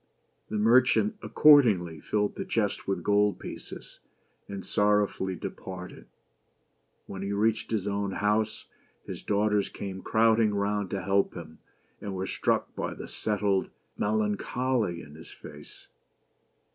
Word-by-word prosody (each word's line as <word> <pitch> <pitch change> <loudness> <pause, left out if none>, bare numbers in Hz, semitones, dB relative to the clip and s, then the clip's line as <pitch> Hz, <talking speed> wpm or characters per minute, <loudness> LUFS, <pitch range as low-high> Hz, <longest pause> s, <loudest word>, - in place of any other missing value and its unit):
The 110 - -2
merchant 125 - +4
accordingly 105 - +5
filled 105 +5 -1
the - - -4
chest 105 -3 -1
with 95 -3 -1
gold 105 -1 +2
pieces, - - -9 0.5
and 100 -1 -7
sorrowfully 105 -2 +1
departed. 90 +1 -8 1.0
When 95 - -7
he 100 +1 -2
reached 110 +2 +1
his 110 -4 -1
own 100 -1 -1
house, 105 +1 0 0.4
his - - -7
daughters 105 0 +1
came 95 -1 -6
crowding 110 -1 +3
round 100 -1 -1
to 95 -2 -4
welcome 100 -2 +1
him, 80 -1 -14 0.4
and 100 -2 -5
were 95 0 -2
struck - - -1
with - - -4
the - - -7
settled 100 -2 0 0.3
melancholy 105 -1 -1
in 75 - -13
his 80 +2 -12
face. 75 -1 -13
100 Hz, 130 wpm, -28 LUFS, 95-110 Hz, 1.0 s, accordingly